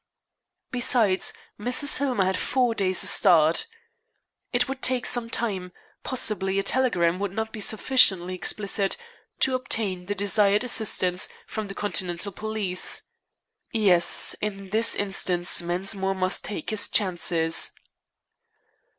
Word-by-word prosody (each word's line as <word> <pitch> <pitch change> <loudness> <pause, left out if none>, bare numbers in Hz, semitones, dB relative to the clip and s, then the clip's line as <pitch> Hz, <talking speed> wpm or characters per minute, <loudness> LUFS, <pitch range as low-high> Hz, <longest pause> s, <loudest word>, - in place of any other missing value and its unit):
Besides, 235 -6 +2 0.3
Mrs. 250 +6 +3
Hillmer 255 -9 0
had 190 0 0
four 250 +3 0
days' 185 -4 +1
start. 165 - +4 0.8
It - - +2
would 270 0 -6
take 255 -1 +1
some 240 -2 +2
time 190 -7 -3 0.3
possibly 200 -6 0
a 195 - 0
telegram 185 -8 0
would 200 -1 -3
not 220 +2 -5
be 215 - -7
sufficiently 200 -5 +3
explicit 195 +2 -1 0.4
to 265 - +3
obtain 210 -8 -2
the 205 - -3
desired 205 +1 +2
assistance 190 -6 0 0.2
from 215 -2 -6
the 195 - -9
Continental 185 -1 -3
police. 210 -2 -2 0.7
Yes 190 -6 +4
in 195 -2 -5
this 225 +2 +4
instance, 180 -3 0
Mensmore 190 +3 -2
must 185 0 -1
take 210 - -5
his 215 -2 +1
chances. 170 -4 0
200 Hz, 120 wpm, -24 LUFS, 185-225 Hz, 0.8 s, start